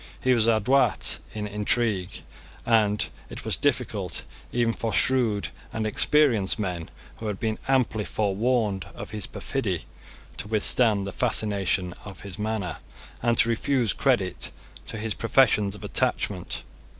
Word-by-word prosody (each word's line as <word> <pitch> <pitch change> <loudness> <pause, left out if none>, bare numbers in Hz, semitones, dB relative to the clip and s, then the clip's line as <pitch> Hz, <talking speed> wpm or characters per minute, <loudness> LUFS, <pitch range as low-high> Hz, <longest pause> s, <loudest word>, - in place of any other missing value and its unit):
He 130 - +3
was 115 -2 +3
adroit 115 +1 +3 0.2
in 105 -1 -3
intrigue; 105 -2 -1 0.4
and 105 -3 +3 0.2
it - - -8
was - - +2
difficult - - 0 0.3
even 120 -1 +1
for 115 -1 -3
shrewd 110 - +2 0.2
and 110 -1 -2
experienced 115 -2 +3
men 90 -6 -3 0.3
who 110 - -5
had 105 -2 -3
been 110 -1 -2
amply 125 -5 +2
forewarned 105 -1 0
of - - -8
his 105 -1 -4
perfidy 100 - -3 0.5
to - - -5
withstand 110 -1 +3
the 100 - -4
fascination 100 -6 +1
of 100 -3 -10
his 100 -2 -8
manner, 105 -6 -2 0.4
and 120 -1 +2
to 115 - +5
refuse 120 -1 +1
credit 120 -10 0 0.4
to - - -5
his 110 0 -2
professions 110 -4 +3
of 105 - -12
attachment. - - -1
110 Hz, 140 wpm, -26 LUFS, 100-120 Hz, 0.5 s, to